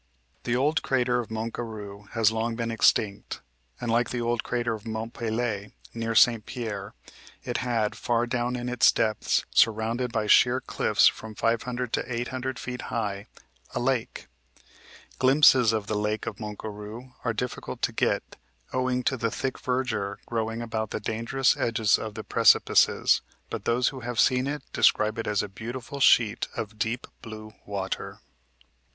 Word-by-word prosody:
The 120 - +1
old 150 +5 +2
crater 125 -2 +1
of 120 - -5
Mont 110 +1 -3
Garou 105 -3 -7
has 115 -2 +3
long 115 +1 -1
been 115 0 -2
extinct, 105 -2 +1 0.4
and, 120 -2 -2
like 120 +1 +2
the 125 - -3
old 120 0 0
crater 120 -1 -1
of 110 0 -8
Mont 110 +1 -4
Pelee, 110 -3 -2 0.2
near 115 0 -3
St. 115 -1 +5
Pierre, 110 -6 -5 0.5
it 120 -2 -2
had 115 -4 0
far 120 0 0
down 120 0 -1
in 120 0 -4
its 125 -1 +5
depths, 110 -2 0
surrounded 115 +2 +2
by 110 -2 -1
sheer 125 +4 +5
cliffs - - +2
from 110 -1 +1
500 120 +2 -1
to - - -1
800 125 +2 -3
feet 125 0 -5
high, 100 -3 -3 0.5
a - - 0
lake. 125 -1 -1 0.9
Glimpses 130 -3 +6
of 110 -2 -1
the 105 - -3
lake 105 +1 -1
of - - -5
Mont 105 -2 -6
Garou 110 +4 -8
are 120 - +1
difficult 120 +3 -5
to - - +2
get, - - -1 0.4
owing 130 0 0
to 135 - +1
the 115 -1 0
thick 130 +4 -3
verdure 125 -6 -1
growing 115 0 -2
about 110 -2 -3
the - - -3
dangerous 115 +4 +1
edges 110 -3 +2
of 110 -2 -6
the - - -5
precipices, - - +4 0.3
but - - -5
those 120 +2 +2
who 135 - -8
have 120 -1 -4
seen 130 0 +3
it 145 -1 -3
describe 110 +1 +3
it 115 - -3
as 105 -1 +1
a - - -4
beautiful 120 +7 -7
sheet 115 -4 +4
of 110 0 -5
deep 115 +3 -1 0.2
blue 110 -1 -9
water. 95 -1 -4
115 Hz, 165 wpm, -27 LUFS, 110-125 Hz, 0.9 s, Glimpses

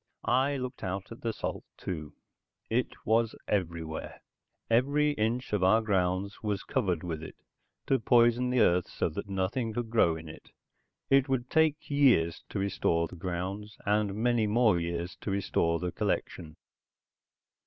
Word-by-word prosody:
I 135 +3 +2
looked 125 -1 -6
out 95 +3 -4
at 115 - -10
the 115 - -1
salt, - - -4
too. 75 -5 -6 0.6
It 120 +2 +2 0.2
was 115 +1 +2
everywhere. 85 -5 -3 0.4
Every 140 +6 +3
inch 120 -1 -1
of 100 -3 +1
our 95 +4 +5
grounds 95 -1 0
was 105 -3 -2
covered 95 - -1
with 80 -3 -4
it, 80 - -9 0.5
to 135 - +2
poison 120 +1 +4
the 125 -1 +3
earth 90 +1 +3
so - - -1
that 100 +5 -6
nothing 100 +5 -1
could 115 0 -3
grow 85 -8 +4
in 80 0 -9
it. 80 - -12 0.6
It 135 0 +5
would 125 -2 -1
take 160 -2 +2
years 120 - +3
to - - -4
restore 85 -4 +1
the 90 - -11
grounds, 95 +4 -4
and 105 -1 +1
many 115 0 +2
more 105 -4 +3
years 85 +1 -3
to - - -6
restore 90 -4 +1
the 90 +1 -3
collection. 80 -2 -3
105 Hz, 155 wpm, -29 LUFS, 90-120 Hz, 0.6 s, our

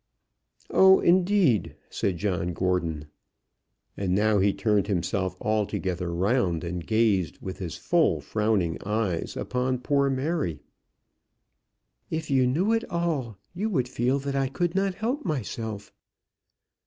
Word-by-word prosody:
"Oh, 190 0 +7
indeed!" 180 - +3 0.2
said 95 -3 -1
John 90 -2 -1
Gordon. 85 -4 -1 0.9
And 95 -2 -1
now 105 0 +3
he 100 +1 +3
turned 100 0 +1
himself 95 0 -1
altogether 95 -4 -1
round, 90 -1 +1
and 85 0 -4
gazed 105 -7 +1
with 95 0 -7
his 90 -4 -5
full 160 - +2
frowning 95 +2 0
eyes 105 -4 0
fixed - - -7
upon 125 +1 -1
poor 140 +2 +1
Mary. 130 - -1 1.5
"If 160 -2 -3
you 130 -2 +4
knew 180 - +1
it 225 - +1
all, 160 - -2 0.2
you 205 +5 -2
would 130 - 0
feel 125 +1 0
that 140 0 -3
I 135 -1 +1
could 170 +5 -1
not 195 -1 0
help 240 +9 -2
myself." 110 - -4
110 Hz, 130 wpm, -26 LUFS, 95-145 Hz, 1.5 s, Oh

